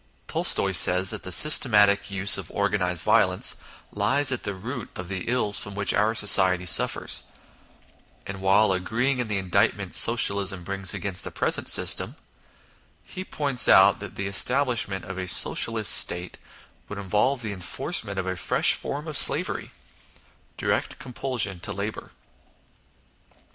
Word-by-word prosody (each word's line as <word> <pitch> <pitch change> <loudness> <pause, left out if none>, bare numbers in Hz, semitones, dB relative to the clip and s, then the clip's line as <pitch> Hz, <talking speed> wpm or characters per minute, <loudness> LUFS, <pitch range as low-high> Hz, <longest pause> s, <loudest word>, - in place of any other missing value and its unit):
Tolstoy - - -1
says 90 +1 +4
that 110 - -7
the 95 - -8
systematic 105 - +5
use 100 0 +4
of 95 - -10
organised 95 -4 -3
violence - - +2 0.4
lies 130 +7 +1
at 130 - -4
the 100 -1 -6
root 115 +5 -9
of 90 -1 -10
the 95 -2 -6
ills 115 -4 -1
from 100 -1 -7
which 100 0 0
our 110 +2 -1
society 95 -4 +4
suffers; 85 - +1 1.0
and 95 0 -9
while 95 +2 +1
agree 110 +8 -3
ing 130 - -5
in 120 - -3
the 105 -2 -3
indictment 95 -2 -2
Socialism 95 -2 +2
brings 95 0 -3
against 95 -2 -5
i - - -5
2 - - -7
INTRODUCTION - - -23
the - - -13
present - - -1
system, - - +2 0.9
he 185 - -10
points 140 -8 -2
out 95 +1 +4
that 105 -2 -11
the 100 - -6
establishment 115 -1 -1
of 95 0 -9
a 95 - -6
Socialist - - +3
State 90 +1 +2 0.5
would 105 - -9
involve 105 +7 -3
the 105 -2 -6
enforcement 100 - -3
of 95 - -4
a 95 0 -5
fresh 95 - +2
form 145 +3 -5
of 155 - -8
slavery - - +1 0.9
direct - - -4
compulsion 120 -7 -4
to - - -5
labour. 100 +3 -8
100 Hz, 155 wpm, -22 LUFS, 95-120 Hz, 1.0 s, systematic